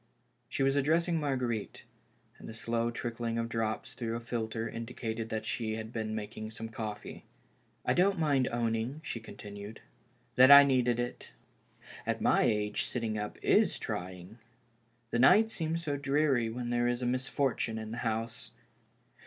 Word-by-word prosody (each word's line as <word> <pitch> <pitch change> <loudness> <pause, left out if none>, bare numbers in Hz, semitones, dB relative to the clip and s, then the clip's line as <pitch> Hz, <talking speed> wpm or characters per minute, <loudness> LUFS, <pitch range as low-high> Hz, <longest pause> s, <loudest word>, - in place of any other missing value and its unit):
She 135 - -1
was 135 0 +3
addi'essing 165 +4 +2
Marguerite, 125 -7 -2 0.6
and - - -9
the 110 - -8
slow 115 0 -1
trickling 115 -1 -3
of 115 0 -1
drops 115 -1 -2
through 115 -2 -3
a - - -2
filter 115 -1 -3
indicated 115 -1 -5
that 110 0 -3
she 110 -1 -2
had 110 +1 -6
been 110 -1 -2
making 110 0 -5
some 115 0 -7
coffee. 110 -2 -6 0.3
" - - -39
I - - +3
don't 190 +2 +3
mind 145 -5 +2
owning," 120 +4 -1
she 115 - -4
continued, 105 -1 -9 0.3
" 120 0 -38
that 130 +1 +8
I 140 0 +12
needed 125 -3 +2
it. 120 0 -4 0.7
At - - -1
my - - +3
age 105 -1 +1
sitting 115 -3 -2
up 105 0 -5
is - - +4
trying. 90 +4 -6 0.7
The 120 - +1
night 210 - +6
seems 165 -2 -2
so 145 -3 -1
dreary 140 -4 +2
when 120 +1 -4
there 120 0 +2
is 120 +1 -1
a - - 0
misfortune 125 -2 0
in 110 0 -6
the 115 - -5
house. 115 0 -3
115 Hz, 165 wpm, -31 LUFS, 110-130 Hz, 0.7 s, I